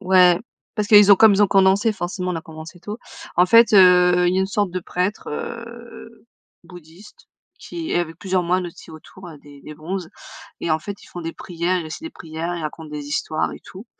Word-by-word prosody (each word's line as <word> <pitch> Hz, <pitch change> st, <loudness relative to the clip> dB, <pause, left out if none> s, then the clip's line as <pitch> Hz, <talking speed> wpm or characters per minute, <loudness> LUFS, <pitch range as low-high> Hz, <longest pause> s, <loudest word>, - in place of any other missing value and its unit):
Ouais. 180 Hz, -2 st, +5 dB, 0.4 s
Parce 210 Hz, -1 st, -2 dB
qu'ils 205 Hz, -2 st, +8 dB
ont -, -, +9 dB
comme 215 Hz, -1 st, +6 dB
ils 205 Hz, -, +3 dB
ont -, -, +5 dB
condensé, 195 Hz, +3 st, +3 dB
forcément 180 Hz, -1 st, -4 dB
on -, -, -3 dB
a -, -, -4 dB
commencé 160 Hz, +2 st, -12 dB
tôt. 210 Hz, +4 st, -7 dB, 0.4 s
En 180 Hz, +1 st, +5 dB
fait, 230 Hz, +2 st, +5 dB
heu, 180 Hz, -1 st, +5 dB
il 180 Hz, -, +1 dB
y -, -, +1 dB
a -, -, +2 dB
une 190 Hz, -, 0 dB
sorte 200 Hz, -2 st, -2 dB
de 185 Hz, -, -3 dB
prêtre, 180 Hz, +5 st, -3 dB
heu, 235 Hz, +4 st, -9 dB, 0.4 s
bouddhiste 175 Hz, +3 st, -16 dB, 0.3 s
qui 335 Hz, -2 st, -7 dB
et -, -, +2 dB
avec 165 Hz, -1 st, -6 dB
plusieurs 185 Hz, -2 st, -1 dB
moines 180 Hz, +1 st, 0 dB
aussi 170 Hz, 0 st, -13 dB
autour, 175 Hz, +3 st, -13 dB
heu, 155 Hz, -3 st, -12 dB
des 145 Hz, -1 st, -16 dB
des 155 Hz, -, -10 dB
bronzes 175 Hz, +3 st, -6 dB, 0.5 s
et 165 Hz, -, -1 dB
en 155 Hz, -, 0 dB
fait 200 Hz, +4 st, -8 dB
ils -, -, -17 dB
font 175 Hz, -, -9 dB
des 165 Hz, 0 st, -5 dB
prières, 175 Hz, +1 st, -3 dB
ils 165 Hz, -, -5 dB
récitent 155 Hz, -, -8 dB
des 325 Hz, -, -7 dB
prières, 165 Hz, +2 st, -6 dB
ils 165 Hz, -, -6 dB
racontent 155 Hz, 0 st, -7 dB
des 150 Hz, -1 st, -7 dB
histoires 155 Hz, +1 st, -2 dB
et -, -, -11 dB
tout. 195 Hz, +5 st, -12 dB
180 Hz, 225 wpm, -21 LUFS, 165-200 Hz, 0.5 s, ont